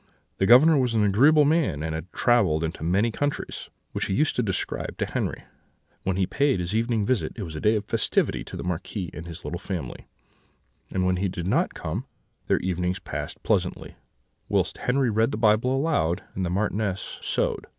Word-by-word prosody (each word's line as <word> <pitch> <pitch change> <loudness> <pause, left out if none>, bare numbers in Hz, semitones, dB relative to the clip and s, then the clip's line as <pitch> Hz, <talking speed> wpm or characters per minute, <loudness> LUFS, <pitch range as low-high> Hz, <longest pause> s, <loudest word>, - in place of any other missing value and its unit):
The 95 - +3
Governor 145 +6 +7
was 125 -3 +1
an 110 - +3
agreeable 140 +10 +5
man, 140 - +1
and 80 0 -2
had 80 +3 -6
travelled 100 -11 +2
into 80 0 -4
many 100 +8 +2
countries, 145 +5 -3 0.2
which - - -2
he 95 - -1
used 150 +2 +2
to - - +2
describe 95 -5 -2
to - - 0
Henri. - - -2 0.6
When 95 -1 +1
he 95 0 +2
paid 140 0 +1
his 90 +4 -2
evening 115 -2 +1
visit 125 0 0
it 110 - -5
was 80 -4 -7
a 75 - -5
day 105 +1 +3
of 105 -1 -2
festivity - - 0
to - - -8
the - - -5
Marquis 90 +1 -4
and 80 +2 -8
his 85 +1 -9
little 85 - -4
family; 90 -10 -6 0.8
and 95 -1 0
when 90 0 +2
he 95 +2 0
did 90 -2 -4
not 95 - +1
come, 100 - -4 0.4
their - - +3
evenings 90 0 -1
passed 95 - -6
pleasantly, - - -1 0.5
whilst - - 0
Henri 125 -1 +1
read 110 +2 +2
the - - -3
Bible 110 +3 +3
aloud 135 - 0
and 95 - -3
the 90 - -1
Marchioness 100 0 -2
sewed. - - -1
100 Hz, 195 wpm, -25 LUFS, 90-120 Hz, 0.8 s, Governor